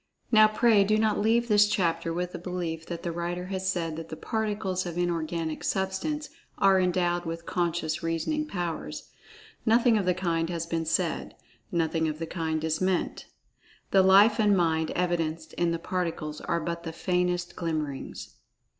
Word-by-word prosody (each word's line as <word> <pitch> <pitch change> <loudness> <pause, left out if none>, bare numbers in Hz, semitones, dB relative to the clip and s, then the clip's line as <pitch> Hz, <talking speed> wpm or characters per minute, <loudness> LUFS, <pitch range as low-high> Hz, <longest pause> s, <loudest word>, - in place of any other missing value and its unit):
Now, 215 -2 +8
pray 215 -1 +4
do 215 +2 +2
not 215 -1 +2
leave 230 +3 +2
this 210 -2 +5
chapter 165 -4 0
with 180 +1 -2
the - - -6
belief 170 -2 -4
that 170 -1 -5
the 170 - -2
writer 175 +1 -3
has 190 0 -1
said 165 -4 -2
that 165 0 -7
the - - -5
Particles 205 -3 -2
of 170 0 -5
Inorganic 165 -2 -2
Substance 195 +11 -2 0.3
are 195 -1 +5
endowed 175 -1 +1
with[Pg 165 0 -4
59] - - -26
Conscious 170 -2 -1
reasoning 165 - -1
powers. 175 - -4 0.5
Nothing 230 0 +4
of 190 - -2
the 180 - +3
kind 165 -3 0
has 170 -2 -2
been 165 -1 -2
said—nothing 165 0 -2
of 155 -1 -3
the 165 - -3
kind 160 -2 -2
is 160 +1 -1
meant. 185 -1 -1 0.6
The 195 - +6
Life 200 +4 +6
and 205 -2 +4
Mind 160 -2 +1
evidenced 165 -3 -1
in 175 -1 +1
the 170 - 0
Particles 165 -4 -3
are 170 - -1
but 170 +1 -3
the 165 -1 -6
faintest 180 0 -1
glimmerings. 155 -5 -4
175 Hz, 170 wpm, -27 LUFS, 165-190 Hz, 0.6 s, Now